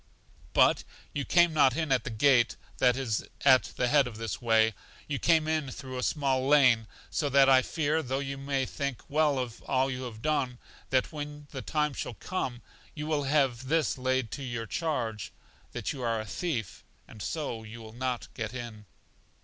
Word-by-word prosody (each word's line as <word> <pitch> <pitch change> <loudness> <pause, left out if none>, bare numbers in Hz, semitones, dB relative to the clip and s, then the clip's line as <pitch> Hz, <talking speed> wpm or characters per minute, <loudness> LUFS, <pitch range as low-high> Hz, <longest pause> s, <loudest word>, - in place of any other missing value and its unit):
But - - +4 0.3
you 140 -2 -2
came 175 -2 +4
not 135 -3 +4
in 160 -4 -1
at 130 +2 +2
the - - -2
gate 120 +1 +3 0.2
that 125 -1 +4
is 120 -6 -1 0.2
at 130 -2 +7
the 125 - +1
head 140 0 +4
of 115 -3 -8
this 110 -3 -4
way, 110 -1 +4 0.3
you 140 -3 -2
came 160 -2 +3
in 155 -3 0
through 130 0 -7
a - - -2
small 135 -2 0
lane; 130 -6 +5 0.2
so 145 -3 0
that 135 0 +6
I 130 -1 +7
fear, 155 +3 0
though 130 -2 -2
you 135 0 -3
may 135 -1 -1
think 140 -1 -4
well 150 -1 +2
of 125 -3 -4
all 135 0 +1
you 125 0 -4
have 110 -2 -9
done, 140 -5 0 0.3
that 130 -1 +1
when 145 -1 -7
the 135 - -5
time 150 0 0
shall 125 - -5
come, 130 - -4 0.3
you 150 -1 -4
will 150 -2 0
have 135 -3 +1
this 160 +1 +2
laid 130 -3 -1
to - - -5
your 120 -3 -4
charge, 115 - -2 0.4
that - - -3
you 135 - -7
are 115 -2 0
a 110 - -4
thief 120 - -4 0.2
and 110 - -12
so 145 -6 -3
you 110 +1 -10
will 110 -1 -11
not 125 0 -3
get 110 +2 -5
in. 115 -4 -7
130 Hz, 195 wpm, -29 LUFS, 120-145 Hz, 0.4 s, at